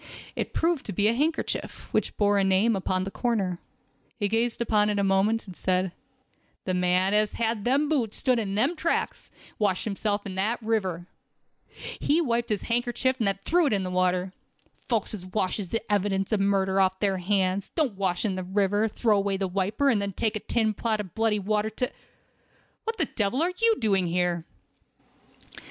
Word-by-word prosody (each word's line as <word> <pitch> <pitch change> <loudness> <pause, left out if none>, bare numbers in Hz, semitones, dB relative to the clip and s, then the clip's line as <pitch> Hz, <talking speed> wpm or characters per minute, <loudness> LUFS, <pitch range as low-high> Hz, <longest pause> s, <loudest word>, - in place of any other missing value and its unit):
It - - -3
proved 330 -3 0
to - - -3
be 205 +4 +2
a 225 - +3
handkerchief, 310 +6 -2
which - - 0
bore 205 -1 +3
a - - +3
name 195 +4 +3
upon 185 -1 -1
the 195 - -5
corner. 195 -8 -1 0.6
He 205 -3 0
gazed 225 +3 0
upon 210 -3 +2
it 205 - 0
a 200 - +2
moment, 195 +4 +2
and 185 -3 -10
said: 185 0 0 0.7
"The 185 - -1
man 180 +2 +2
as 210 0 +2
had 225 -1 -1
on - - -9
them 275 +4 +2
boots 255 -8 0
stood 255 -3 +2
in 200 -3 -2
them 265 +11 +2
tracks, 330 +1 -2
and - - -21
washed 200 -4 +1
himself 205 0 -1
in 195 - -5
that 205 +6 0
river. 190 -6 -1 0.9
He 300 +3 +2
wiped 235 -7 0
upon - - +2
this 200 - -4
hankercher 240 +2 0
and 220 - +1
then 195 -1 +1
threw 345 -1 +3
it 255 - +1
into 190 -2 -1
the - - -4
water. 185 0 +1 0.6
Folks 225 -4 0
as 200 -4 -6
washes 185 0 -2
the 225 - -2
evidence 195 -1 0
of 215 - +2
murder 195 -1 +2
off 190 0 +1
their 195 -2 +1
hands, 190 +1 0
don't 300 -9 0
wash 190 0 -1
in 205 - +1
the 185 0 -3
river, 205 +3 +1
throw 220 0 +1
away 200 -1 0
the 195 0 -1
wiper, 200 +8 0
and 210 -4 +1
then 200 -1 -3
take 215 +3 -1
a - - -1
tin 220 0 0
pot 220 +1 -1
of 190 -5 -6
bloody 225 -1 +1
water 210 +2 0
to—" 250 +4 -3 0.9
"What 450 0 -2
the 320 - +1
devil 240 +5 -1
are 360 +2 0
you 460 -1 +5
doing 195 -5 +2
here?" 175 -1 0
205 Hz, 200 wpm, -26 LUFS, 190-230 Hz, 0.9 s, you